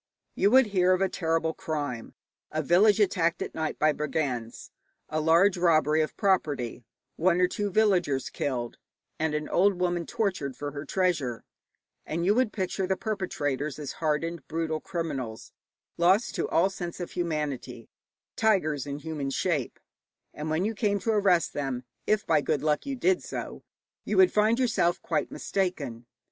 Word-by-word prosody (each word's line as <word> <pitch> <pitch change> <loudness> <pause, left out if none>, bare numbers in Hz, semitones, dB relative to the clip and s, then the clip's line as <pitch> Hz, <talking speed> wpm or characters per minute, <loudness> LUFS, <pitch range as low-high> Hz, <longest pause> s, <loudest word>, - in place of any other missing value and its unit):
You 200 - +3
would 260 +3 +6
hear 185 -1 +4
of 185 - 0
a 195 - +3
terrible 165 -1 0
crime, 145 -9 -4 0.3
a 155 0 -2
village 200 +8 +5
attacked 170 -4 +2
at - - -7
night 160 -1 -3
by 155 0 +4
brigands, 140 -6 -3 0.4
a 155 0 -1
large 170 +5 +4
robbery 155 -3 +3
of 155 - -3
property, 145 - 0 0.3
one 175 +1 +3
or 180 - +4
two 205 +2 -2
villagers 180 -10 +2
killed, 120 -4 -3 0.4
and 155 -1 0
an 150 0 -2
old 190 0 +2
woman 175 -2 0
tortured 180 - -2
for 145 +2 -5
her 145 +1 -6
treasure, 155 -9 0 0.6
and 170 +2 -2
you 200 - +4
would 245 -1 +2
picture 190 -1 -2
the 190 0 0
perpetrators 150 - -2
as 150 -3 -5
hardened, 155 -1 -1
brutal 160 0 -2
criminals, 135 -11 -4 0.5
lost 190 +7 +3
to - - -2
all 185 +4 +3
sense 175 -3 -6
of 175 - -5
humanity, 150 -8 -3 0.5
tigers 155 - +1
in 140 0 -4
human 150 -2 -4
shape; 145 -1 -1 0.5
and 150 +1 -5
when 160 +5 0
you 220 - -1
came 205 -1 +1
to 205 +4 -1
arrest 195 -5 +3
them 135 -3 -3 0.2
if 215 -1 +2
by 155 -2 +3
good 145 -1 -1
luck 155 - 0
you 275 - -2
did 365 +8 +2
so - - -6 0.4
you - - -2
would 375 -1 +6
find 215 +2 +3
yourself 220 -9 +1
quite - - -1
mistaken. 140 -12 -3
165 Hz, 165 wpm, -27 LUFS, 145-190 Hz, 0.6 s, would